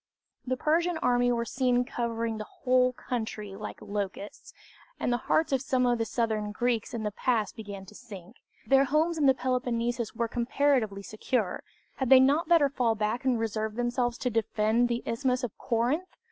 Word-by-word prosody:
The 255 0 0
Persian 335 +4 +1
army 245 -4 +2
were 235 -1 0
seen 250 0 +1
covering 230 -2 -3
the - - -3 0.2
whole 255 0 +4
country 220 -5 -5
like 210 +1 -7
locusts, 200 0 -5 0.5
and 245 - 0
the - - +2
hearts 315 - +2
of 265 - +2
some 255 -2 +1
of 240 -1 +2
the 225 - 0
southern 220 -2 -1
Greeks 235 +1 -1
in 225 - -3
the 210 - -1
pass 220 -1 0
began 200 -3 -8
to 195 - -14
sink. 210 -3 -12 0.3
Their 270 0 +4
homes 315 +4 +1
in 285 - +4
the 265 - +5
Peloponnesus 240 -3 -1
were 235 0 0
comparatively 235 -4 0
secure 215 -1 -2 0.4
had 265 -3 -1
they 265 -1 +9
not 285 +6 +3
better 330 -4 +5
fall 245 -5 0
back 215 +4 -2
and 250 -3 +2
reserve 220 -1 -2
themselves 240 0 -1
to 250 - -2
defend 225 +1 +1
the 235 0 -2
Isthmus 250 +2 0
of 240 - -4
Corinth? 260 +9 0
240 Hz, 180 wpm, -28 LUFS, 220-255 Hz, 0.5 s, they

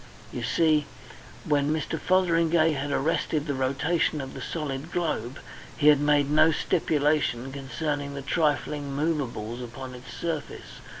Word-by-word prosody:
You - - -4
see, 155 -3 +2 0.6
when 145 -1 +2
Mr. 155 +1 -2
Fotheringay 170 -2 +3
had 140 -1 -3
arrested 150 +1 0
the 145 - -1
rotation 140 +5 0
of 135 -1 -6
the - - -7
solid 150 -1 -4
globe, 150 -8 -2 0.4
he 150 0 +5
had 145 -2 +6
made 145 -1 +2
no 155 +1 +5
stipulation 145 -5 +1
concerning 140 +1 -3
the 140 - -5
trifling 145 -1 0
movables 130 -7 -2
upon 130 +2 -7
its 125 +1 -11
surface. 160 -4 -5
145 Hz, 135 wpm, -26 LUFS, 135-160 Hz, 0.6 s, had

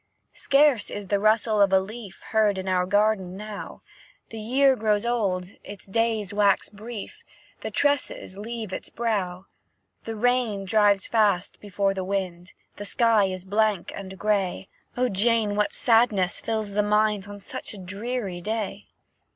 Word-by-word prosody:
"Scarce 275 -5 +3
is 205 -2 -6
the 200 - +2
rustle 215 0 +3
of 200 -1 +5
a 190 - +6
leaf 210 +1 -9
Heard 215 -3 +2
in 190 0 -4
our 180 -1 +1
garden 205 -2 +1
now; 210 0 -8 0.5
The 225 - -7
year 265 +5 +3
grows 215 -1 +1
old, 195 -7 0
its 205 0 -10
days 220 -1 0
wax 205 -1 +3
brief, 215 +1 -8 0.4
The - - -4
tresses 285 -9 0
leave 220 -1 -6
its - - -5
brow. 195 -6 -2 0.6
The 225 - -4
rain 235 -3 +1
drives 205 -1 +3
fast 205 -5 +1
before 200 -1 0
the 190 -1 -3
wind, 185 -2 -3 0.2
The 205 - -6
sky 225 -2 +3
is 185 -1 -4
blank 210 -1 +1
and 190 -1 -8
grey; 195 -2 -1 0.3
O 250 0 +2
Jane, 215 0 +2
what 210 0 +1
sadness 225 -6 +2
fills 220 -2 -2
the 205 +1 +2
mind 210 -1 +1
On 205 0 -9
such 200 - -6
a - - -10
dreary 200 0 -4
day!" 210 - -4
205 Hz, 155 wpm, -25 LUFS, 195-225 Hz, 0.6 s, a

